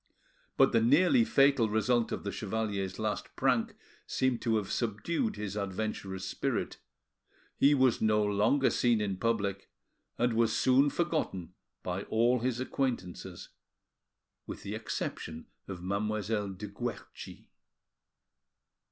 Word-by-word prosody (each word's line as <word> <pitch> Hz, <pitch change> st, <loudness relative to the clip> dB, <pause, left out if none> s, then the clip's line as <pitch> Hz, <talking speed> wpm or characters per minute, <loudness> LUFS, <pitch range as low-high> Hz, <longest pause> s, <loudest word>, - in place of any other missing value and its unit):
But -, -, +5 dB
the 115 Hz, -, +3 dB
nearly 180 Hz, -, +5 dB
fatal 135 Hz, -, +4 dB
result 110 Hz, +2 st, +1 dB
of -, -, -3 dB
the 100 Hz, -, -3 dB
chevalier's 100 Hz, -3 st, -3 dB
last -, -, -3 dB
prank -, -, +1 dB, 0.3 s
seemed 130 Hz, -2 st, 0 dB
to 115 Hz, -1 st, +1 dB
have 105 Hz, -3 st, -1 dB
subdued 165 Hz, -, -1 dB
his 105 Hz, -1 st, -5 dB
adventurous 95 Hz, -1 st, -3 dB
spirit; -, -, -2 dB, 0.8 s
he 145 Hz, +1 st, +5 dB
was 130 Hz, -3 st, +3 dB
no 105 Hz, -1 st, +3 dB
longer 105 Hz, +7 st, +2 dB
seen 120 Hz, -2 st, +2 dB
in 100 Hz, -3 st, -2 dB
public, 100 Hz, -3 st, -1 dB, 0.5 s
and 120 Hz, 0 st, +1 dB
was 115 Hz, -1 st, +2 dB
soon 135 Hz, +3 st, +4 dB
forgotten 155 Hz, -, -2 dB, 0.3 s
by 90 Hz, +1 st, -3 dB
all 120 Hz, +3 st, +2 dB
his 125 Hz, 0 st, -1 dB
acquaintances 95 Hz, -9 st, -3 dB, 1.0 s
with -, -, -7 dB
the 100 Hz, -, -5 dB
exception 80 Hz, -7 st, -5 dB, 0.2 s
of 90 Hz, -3 st, -7 dB
Mademoiselle 105 Hz, +1 st, -1 dB
de 95 Hz, +2 st, -7 dB
Guerchi. 120 Hz, +4 st, -7 dB
110 Hz, 125 wpm, -30 LUFS, 100-125 Hz, 1.0 s, But